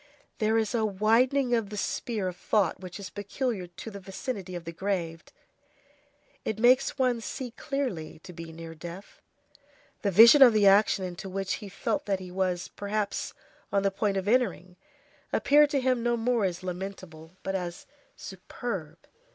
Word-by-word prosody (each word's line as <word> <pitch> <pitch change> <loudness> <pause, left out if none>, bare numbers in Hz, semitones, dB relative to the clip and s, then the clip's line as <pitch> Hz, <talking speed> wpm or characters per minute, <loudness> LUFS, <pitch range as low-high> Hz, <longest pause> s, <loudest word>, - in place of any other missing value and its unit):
There 220 +1 +2
is 220 0 0
a 230 -2 +1
widening 235 +6 +2
of 225 -4 +1
the 210 - -6
sphere 210 -1 -2
of 180 - -4
thought 180 0 +1
which 185 +1 -8
is 200 - -7
peculiar 205 -1 -3
to 175 +6 -9
the 200 - -8
vicinity 195 -1 -5
of 175 - -5
the 165 - -5
grave; 170 -2 -3 1.2
it 220 - -2
makes 250 +5 +4
one 250 -3 +1
see 250 +2 -5
clearly 250 - -4
to 180 - -10
be 165 -1 -8
near 165 0 -9
death. 175 +4 -10 0.8
The 205 - +1
vision 230 - +8
of 250 -4 +9
the 210 -2 +4
action 195 -1 +5
into 180 +1 -6
which 195 +1 -2
he 205 - -8
felt 285 +8 -2
that 195 -2 0
he 185 -1 -9
was, 180 -1 -1
perhaps, 205 0 -3 0.4
on 200 -1 +2
the 195 - +2
point 195 0 0
of 190 +1 -2
entering, 205 -6 +1 0.6
appeared 295 +1 +5
to 285 - +1
him 255 -2 +1
no 240 0 +1
more 230 -2 +1
as 180 -1 -3
lamentable, 180 -3 -7
but 195 - -2
as 175 -2 -4 0.3
superb. 190 -4 -6
200 Hz, 170 wpm, -28 LUFS, 180-235 Hz, 1.2 s, of